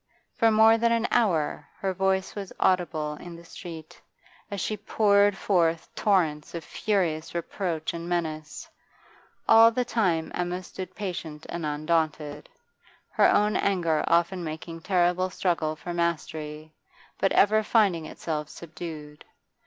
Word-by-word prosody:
For 230 Hz, -, +3 dB
more 220 Hz, +1 st, +6 dB
than 235 Hz, 0 st, +3 dB
an 230 Hz, 0 st, +2 dB
hour 180 Hz, -11 st, +1 dB
her 190 Hz, -1 st, -2 dB
voice 190 Hz, +1 st, 0 dB
was 200 Hz, -2 st, -6 dB
audible 160 Hz, -5 st, +1 dB
in 175 Hz, -1 st, -9 dB
the 170 Hz, 0 st, -13 dB
street, 165 Hz, -2 st, -10 dB, 0.5 s
as 200 Hz, -, -4 dB
she 215 Hz, -, -1 dB
poured 205 Hz, -2 st, +3 dB
forth 170 Hz, -4 st, +1 dB
torrents 165 Hz, -7 st, +1 dB
of 165 Hz, -, -5 dB
furious 175 Hz, -7 st, -1 dB
reproach 170 Hz, -2 st, -3 dB
and 170 Hz, 0 st, -6 dB
menace; 155 Hz, -3 st, -3 dB, 0.8 s
all 225 Hz, 0 st, +8 dB
the 245 Hz, +2 st, -1 dB
time 180 Hz, -10 st, 0 dB
Emma 180 Hz, +1 st, -2 dB
stood 185 Hz, +1 st, -8 dB
patient 165 Hz, -6 st, -5 dB
and 170 Hz, -2 st, -3 dB
undaunted, 150 Hz, -1 st, -1 dB, 0.6 s
her -, -, +4 dB
own 210 Hz, +1 st, +3 dB
anger 170 Hz, -6 st, +1 dB
often 170 Hz, +2 st, +2 dB
making 165 Hz, +1 st, -6 dB
terrible 180 Hz, 0 st, +1 dB
struggle 170 Hz, -4 st, -1 dB
for 175 Hz, +3 st, -6 dB
mastery, 155 Hz, -2 st, -3 dB, 0.5 s
but 195 Hz, -, +2 dB
ever 215 Hz, +2 st, +5 dB
finding 200 Hz, -7 st, +2 dB
itself 150 Hz, -2 st, -4 dB
subdued. 155 Hz, -3 st, -9 dB
175 Hz, 135 wpm, -26 LUFS, 160-195 Hz, 0.8 s, all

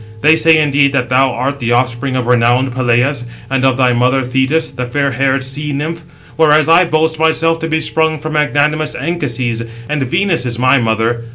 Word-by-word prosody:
They 155 Hz, +2 st, +5 dB
say, 160 Hz, 0 st, +4 dB
indeed, 140 Hz, -2 st, +2 dB
that 125 Hz, -3 st, -1 dB
thou 130 Hz, +1 st, +3 dB
art 135 Hz, +4 st, -3 dB
the 120 Hz, -2 st, -1 dB
offspring 125 Hz, +2 st, -1 dB
of 125 Hz, -2 st, -1 dB
renowned 125 Hz, +1 st, +1 dB
Peleus, 125 Hz, +1 st, 0 dB, 0.3 s
and 135 Hz, -1 st, 0 dB
of 130 Hz, -1 st, +2 dB
thy 125 Hz, -2 st, +2 dB
mother 125 Hz, +2 st, +1 dB
Thetis, 130 Hz, +6 st, -1 dB
the 125 Hz, -1 st, -5 dB
fair 140 Hz, +2 st, -1 dB
haired 135 Hz, +1 st, 0 dB
sea 145 Hz, +3 st, -4 dB
nymph; 160 Hz, +4 st, -4 dB, 0.4 s
whereas 155 Hz, -1 st, +3 dB
I 170 Hz, +3 st, +5 dB
boast 160 Hz, -1 st, 0 dB
myself 165 Hz, +1 st, +1 dB
to 160 Hz, -, -3 dB
be 160 Hz, 0 st, -1 dB
sprung 160 Hz, 0 st, 0 dB
from 155 Hz, +1 st, -6 dB
magnanimous 150 Hz, +1 st, 0 dB
Anchises, 125 Hz, -6 st, -3 dB, 0.3 s
and 150 Hz, -1 st, -2 dB
Venus 170 Hz, +3 st, 0 dB
is 120 Hz, -2 st, -4 dB
my 130 Hz, +2 st, +3 dB
mother. 115 Hz, +1 st, -1 dB
135 Hz, 190 wpm, -14 LUFS, 125-155 Hz, 0.4 s, They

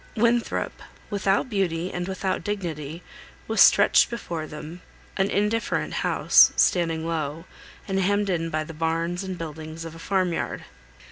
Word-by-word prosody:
Winthrop, 235 Hz, +1 st, 0 dB, 0.3 s
without 200 Hz, +2 st, +1 dB
beauty 185 Hz, -5 st, -1 dB
and 175 Hz, 0 st, -3 dB
without 190 Hz, 0 st, -2 dB
dignity, 170 Hz, -6 st, -4 dB, 0.4 s
was -, -, +2 dB
stretched -, -, +6 dB
before 170 Hz, -9 st, -5 dB
them; 155 Hz, +4 st, -9 dB, 0.3 s
an 195 Hz, 0 st, +1 dB
indifferent 210 Hz, +3 st, 0 dB
house, -, -, +5 dB
standing 165 Hz, -2 st, +2 dB
low, 160 Hz, 0 st, -3 dB, 0.4 s
and 195 Hz, 0 st, 0 dB
hemmed 200 Hz, +2 st, +1 dB
in 165 Hz, -3 st, -1 dB
by 155 Hz, -1 st, -1 dB
the 165 Hz, +1 st, -9 dB
barns 165 Hz, +3 st, -1 dB
and 190 Hz, -1 st, -5 dB
buildings 160 Hz, 0 st, -7 dB
of 165 Hz, -, -7 dB
a 165 Hz, -, -11 dB
farm 185 Hz, -1 st, 0 dB
yard. -, -, -3 dB
175 Hz, 145 wpm, -25 LUFS, 160-195 Hz, 0.4 s, stretched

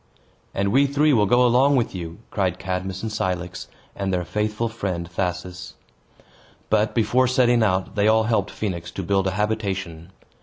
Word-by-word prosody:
"And 100 Hz, 0 st, 0 dB
we 140 Hz, +4 st, +4 dB
three 145 Hz, +2 st, +3 dB
will 105 Hz, -5 st, +3 dB
go 125 Hz, +4 st, +4 dB
along 130 Hz, +4 st, +4 dB
with 120 Hz, -4 st, 0 dB
you!" 85 Hz, -2 st, -6 dB
cried 95 Hz, -3 st, 0 dB
Cadmus 95 Hz, +1 st, -4 dB
and 110 Hz, -, -3 dB
Cilix, 90 Hz, -4 st, -3 dB, 0.3 s
and 100 Hz, -1 st, -2 dB
their 90 Hz, -1 st, -1 dB
faithful 105 Hz, +5 st, -1 dB
friend 95 Hz, -6 st, -4 dB
Thasus. 90 Hz, 0 st, -4 dB, 1.0 s
But, 110 Hz, 0 st, +2 dB
before 120 Hz, +3 st, +3 dB
setting 125 Hz, -2 st, +3 dB
out, 95 Hz, -3 st, +1 dB
they 105 Hz, -1 st, +2 dB
all 110 Hz, 0 st, +4 dB
helped 110 Hz, -3 st, 0 dB
Phoenix 90 Hz, -6 st, -4 dB
to 95 Hz, -, -4 dB
build 95 Hz, +2 st, +1 dB
a -, -, 0 dB
habitation. 95 Hz, -6 st, -2 dB
100 Hz, 165 wpm, -23 LUFS, 90-110 Hz, 1.0 s, we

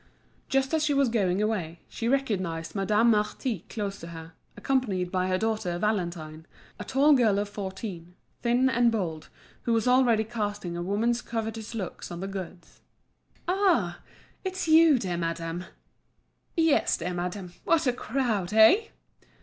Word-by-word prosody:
Just 270 Hz, +1 st, +1 dB
as 315 Hz, -1 st, +2 dB
she 295 Hz, -2 st, +1 dB
was 275 Hz, -3 st, +3 dB
going 200 Hz, -3 st, +1 dB
away, 175 Hz, -7 st, -2 dB
she 230 Hz, -, -4 dB
recognised 185 Hz, -11 st, -1 dB
Madame 210 Hz, +4 st, +3 dB
Marty 210 Hz, -, -1 dB
close 200 Hz, -3 st, -4 dB
to 165 Hz, -, -9 dB
her, 165 Hz, -1 st, -9 dB, 0.2 s
accompanied 210 Hz, -7 st, 0 dB
by 185 Hz, -1 st, 0 dB
her 185 Hz, 0 st, +1 dB
daughter 215 Hz, -5 st, -1 dB
Valentine, 170 Hz, -6 st, -2 dB, 0.3 s
a -, -, -4 dB
tall 285 Hz, +3 st, +4 dB
girl 225 Hz, -7 st, +4 dB
of 205 Hz, 0 st, 0 dB
fourteen, 190 Hz, -3 st, -7 dB, 0.3 s
thin 245 Hz, +2 st, +3 dB
and 240 Hz, -2 st, +3 dB
bold, 170 Hz, -8 st, -3 dB, 0.3 s
who 235 Hz, -, 0 dB
was 225 Hz, +1 st, +1 dB
already 250 Hz, -3 st, +4 dB
casting 205 Hz, -5 st, -4 dB
a 175 Hz, -, -3 dB
woman's 225 Hz, +6 st, 0 dB
covetous 225 Hz, -1 st, -5 dB
looks 195 Hz, -6 st, -5 dB
on 175 Hz, -, -6 dB
the 195 Hz, -, -4 dB
goods. 185 Hz, -3 st, -8 dB, 0.7 s
"Ah! 350 Hz, -, +2 dB, 0.4 s
it's 375 Hz, -2 st, -3 dB
you, 320 Hz, -2 st, +6 dB
dear 185 Hz, -7 st, -2 dB
madame?" 165 Hz, +1 st, -3 dB, 0.9 s
"Yes, 325 Hz, -3 st, +3 dB
dear 180 Hz, +1 st, -3 dB
madame; 180 Hz, +1 st, -4 dB
what 325 Hz, -2 st, +2 dB
a 250 Hz, -, +2 dB
crowd—eh?" 220 Hz, -, +3 dB
210 Hz, 150 wpm, -27 LUFS, 180-245 Hz, 0.9 s, you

